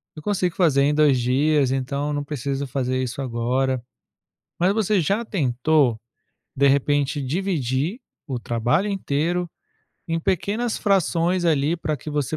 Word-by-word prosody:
eu 155 - -8
consigo 185 -2 -1
fazer 150 -7 +3
em 145 +1 +2
2 145 -4 +4
dias, 135 +2 +2
então 140 +3 -2
não 145 0 -2
preciso 140 -1 -3
fazer 130 -1 -1
isso 130 +2 -4
agora". 130 +1 -1 0.8
Mas 185 +3 +3
você 215 -2 +1
já 200 +9 0
tentou, 140 - +1 0.6
de 140 +1 +4
repente, 140 +1 +1
dividir 155 - -1 0.3
o 130 -3 -3
trabalho 120 - 0
inteiro 175 -1 -1 0.6
em 165 0 -1
pequenas 210 +7 -1
frações, 180 -2 +1
ali, 155 +1 +2
pra 155 -2 -2
que 150 - -8
você 150 +1 -1
145 Hz, 140 wpm, -23 LUFS, 130-175 Hz, 0.8 s, 2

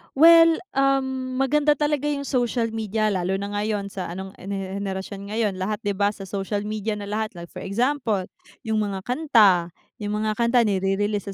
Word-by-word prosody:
Well, 330 +2 +7
um, 265 -1 0
maganda 295 +3 +3
talaga 295 0 0
yung 285 -1 -1
social 240 -3 0
media 215 -1 -1
lalo 185 0 0
na 200 +1 -4
ngayon 205 -1 -2
sa 185 -3 -5
anong 190 +2 -6
an 185 - -10
henerasyon 195 0 -5
ngayon 210 -3 -1
lahat 210 +4 -3
di 205 - 0
ba 200 +1 +1
sa 205 -1 -4
social 200 +1 -3
media 215 0 -3
na 205 - -6
lahat, 210 0 -3
like 170 0 -9
for - - -8
example, 225 -1 0 0.4
yung 220 -1 0
mga 195 -2 -2
kanta, 215 - +3 0.2
yung 210 +1 -2
mga 215 +1 -1
kanta 235 0 +4
ni-re-release 205 +1 0
210 Hz, 175 wpm, -24 LUFS, 195-250 Hz, 0.4 s, Well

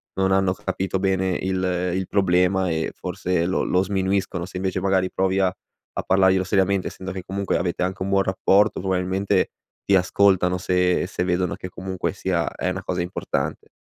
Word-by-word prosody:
non 95 0 +1
hanno 95 -1 +3
capito 95 0 -3
bene 95 -1 +1
il 95 0 -1 0.3
il 95 -1 -2
problema, 95 -1 +2
e 80 -1 -1
forse 90 -2 -1
lo 95 - 0
lo 90 +1 +2
sminuiscono. 95 -2 -1
Se 95 - -13
invece, 95 0 -1
magari, 95 -1 +1
provi 95 0 +1
a 95 -1 +2 0.4
a - - -2
parlarglielo 95 0 +3
seriamente 95 0 +1
essendo 95 0 -6
che, 95 - -5
comunque, 100 +2 -1
avete 85 0 -1
anche 90 +1 -3
un - - -3
buon 100 0 +3
rapporto, 100 +2 +2
probabilmente 95 +1 0 0.4
ti 100 - +2
ascoltano 90 -1 +3
se 90 0 +1
se 90 - -2
vedono 90 0 0
che, - - -7
comunque 95 0 -4
sia, 90 -4 -1
è 90 - -3
una 95 +1 -3
cosa 90 -1 -2
importante. 90 +1 -3
95 Hz, 180 wpm, -23 LUFS, 90-95 Hz, 0.4 s, hanno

